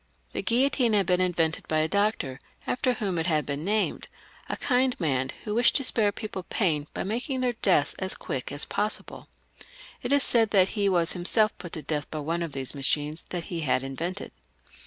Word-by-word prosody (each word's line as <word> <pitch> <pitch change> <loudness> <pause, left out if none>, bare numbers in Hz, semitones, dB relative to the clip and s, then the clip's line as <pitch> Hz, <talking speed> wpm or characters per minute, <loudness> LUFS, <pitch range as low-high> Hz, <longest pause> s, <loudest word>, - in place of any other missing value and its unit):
The - - -2
guillotine 245 -1 +2
had 200 -2 +3
been 180 +1 +2
invented 165 -3 0
by 155 - 0
a 155 0 +2
doctor 200 -9 0 0.3
after 250 0 +1
whom 195 -7 -2
it 165 - -1
had 155 -4 +1
been 145 +2 -3
named 210 +3 0 0.2
— - - -24
a - - -2
kind 255 -1 +1
man 135 -6 0
who 210 - -3
wished 235 +2 +4
to 275 - +3
spare 220 -5 +3
people 205 -2 -6
pain 160 -6 -1
by - - -2
making 245 - -2
their 250 -1 +1
deaths 190 -9 +2
as 190 0 -3
quick 130 -1 -5
as 145 +1 -2
possible. 210 +1 -3 0.7
It 245 - -3
is 285 -1 +7
said 225 -3 +4
that 190 -2 +4
he 205 -3 +1
was 175 -3 +2
himself 215 +5 +3
put 175 - -8
to 155 - -5
death 150 -3 -3
by 155 - -5
one 165 +3 -2
of 165 -4 -4
these 135 -2 -5
machines 150 +2 -1
that 175 -2 -3
he 170 -1 -5
had 135 -4 +1
invented. 170 +9 -4
180 Hz, 205 wpm, -27 LUFS, 155-215 Hz, 0.7 s, is